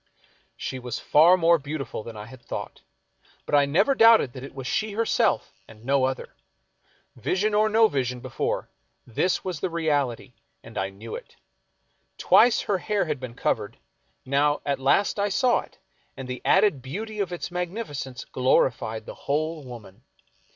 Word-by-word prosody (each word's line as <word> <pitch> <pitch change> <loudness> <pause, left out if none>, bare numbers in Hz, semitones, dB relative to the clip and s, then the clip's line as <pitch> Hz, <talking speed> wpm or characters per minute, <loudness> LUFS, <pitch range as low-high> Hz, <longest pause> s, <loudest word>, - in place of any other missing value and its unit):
She 130 - -5
was 125 -2 -5
far 170 +5 +5
more 170 -1 +4
beautiful 145 -4 -5
than 110 0 -9
I 105 - -7
had 120 +2 -13
thought, - - -6 0.6
but - - -8
I 145 -1 +5
never 195 - +3
doubted 225 - +6
that 130 - -8
it 135 - -10
was 135 -2 -7
she 215 +10 -1
herself 225 +2 +1
and 110 0 -16
no 135 0 +3
other. 130 0 -4 0.8
Vision 205 +3 0
or 215 +1 +3
no 220 +1 +5
vision 125 - -2
before, 130 +1 -3 0.3
this 175 +10 0
was 180 -5 -3
the 185 - -2
reality, 145 -7 -1 0.3
and - - -13
I 95 +1 -1
knew 105 +4 -10
it. - - -9 0.8
Twice 240 +1 +5
her 195 -3 -1
hair 210 +1 0
had 150 -4 -3
been 125 -2 -8
covered, 105 -1 -2 0.5
now 145 +2 +1
at 140 -1 -1
last 170 +10 +2
I 205 +1 +1
saw 245 +4 +2
it, - - -12 0.4
and 135 - -7
the 125 -1 -5
added 190 -8 +3
beauty 210 - -6
of 195 -3 -1
its 175 0 -5
magnificence 175 - -5
glorified 115 -3 +1
the - - -8
whole 155 +2 -2
woman. 120 -4 -11
145 Hz, 165 wpm, -25 LUFS, 125-190 Hz, 0.8 s, doubted